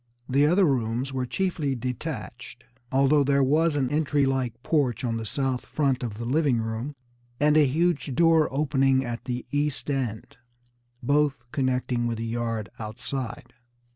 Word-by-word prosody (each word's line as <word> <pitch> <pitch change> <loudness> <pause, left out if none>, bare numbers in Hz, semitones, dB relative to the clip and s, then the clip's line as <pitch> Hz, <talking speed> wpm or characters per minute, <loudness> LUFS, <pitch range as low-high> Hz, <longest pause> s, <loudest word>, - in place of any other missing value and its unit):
The 140 +3 +3
other 185 +4 +4
rooms 130 -1 0
Were 130 -1 -2
chiefly 160 -5 -1
detached, 125 -1 -6 0.3
although 140 +2 +4
there 140 0 +3
was 155 +4 +2
an 135 -3 0
entry 145 -2 +2
like 130 -4 -1
porch 135 -8 +1
on 115 -2 -1
the 110 -1 -5
south 135 +1 -1
front 135 -4 0
of 115 -4 -4
the 115 - -5
living 140 0 +2
room, 115 +6 -4 0.4
and 150 +1 +4
a 150 -2 +6
huge 145 -3 0
door 165 0 +4
opening 135 -2 +2
at 120 -1 -5
the 125 -1 -3
east 145 0 -1
end, 125 -6 -3 0.7
both 145 -1 +1
connecting 125 -2 0
with 115 -1 -2
the 115 - -3
yard 115 -3 -3
outside. 125 +2 -6
135 Hz, 155 wpm, -26 LUFS, 120-145 Hz, 0.7 s, a